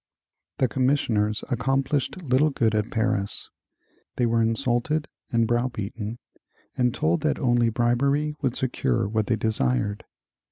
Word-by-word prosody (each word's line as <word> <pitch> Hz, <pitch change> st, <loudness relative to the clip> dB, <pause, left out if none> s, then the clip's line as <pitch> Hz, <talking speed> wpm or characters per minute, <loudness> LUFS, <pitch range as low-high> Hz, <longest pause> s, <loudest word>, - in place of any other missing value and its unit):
The 130 Hz, -, +2 dB
commissioners 115 Hz, -4 st, +1 dB
accomplished 135 Hz, +7 st, 0 dB
little 140 Hz, +2 st, +3 dB
good 115 Hz, -6 st, +1 dB
at 105 Hz, +1 st, 0 dB
Paris. 110 Hz, -3 st, -1 dB, 0.6 s
They 120 Hz, -, +1 dB
were 115 Hz, 0 st, +2 dB
insulted 120 Hz, +6 st, 0 dB, 0.2 s
and 115 Hz, -1 st, +3 dB
browbeaten 115 Hz, -2 st, -2 dB, 0.6 s
and 125 Hz, -1 st, +2 dB
told 85 Hz, -5 st, 0 dB
that -, -, +1 dB
only 120 Hz, -3 st, +2 dB
bribery 140 Hz, +6 st, +1 dB
would 130 Hz, -4 st, 0 dB
secure 100 Hz, -, 0 dB
what 110 Hz, 0 st, -1 dB
they 115 Hz, -, +2 dB
desired. 100 Hz, -, 0 dB
120 Hz, 125 wpm, -25 LUFS, 110-130 Hz, 0.6 s, little